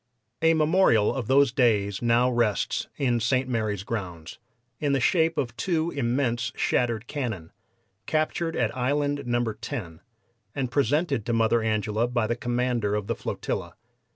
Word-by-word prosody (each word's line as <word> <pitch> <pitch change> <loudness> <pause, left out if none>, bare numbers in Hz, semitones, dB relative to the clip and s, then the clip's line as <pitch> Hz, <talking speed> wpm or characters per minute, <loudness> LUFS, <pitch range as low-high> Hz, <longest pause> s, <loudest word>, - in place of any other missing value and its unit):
A 165 0 +4
memorial 155 - +3
of 125 -5 -4
those 140 -1 +4
days 105 -6 +1
now 120 +1 +3
rests 120 -6 0
in 125 -4 +1
St. 130 +3 +1
Mary's 110 -5 -1
grounds, 90 -7 -6 0.4
in 145 -2 0
the 135 - +2
shape 165 +4 +2
of 120 -4 -2
two 170 0 -1
immense 120 -3 -1
shattered 120 -2 0
cannon, 115 - -4 0.6
captured 160 +1 0
at 115 -3 0
Island 145 +3 0
No. 120 0 +1
10, 100 -6 -7 0.5
and 130 -3 -2
presented 145 -1 +1
to 120 - 0
Mother 115 0 +3
Angela 110 +1 0
by 120 -2 0
the 120 - -1
commander 120 -3 -1
of 105 -1 -2
the 115 - -1
flotilla. - - -4
120 Hz, 150 wpm, -26 LUFS, 110-140 Hz, 0.6 s, A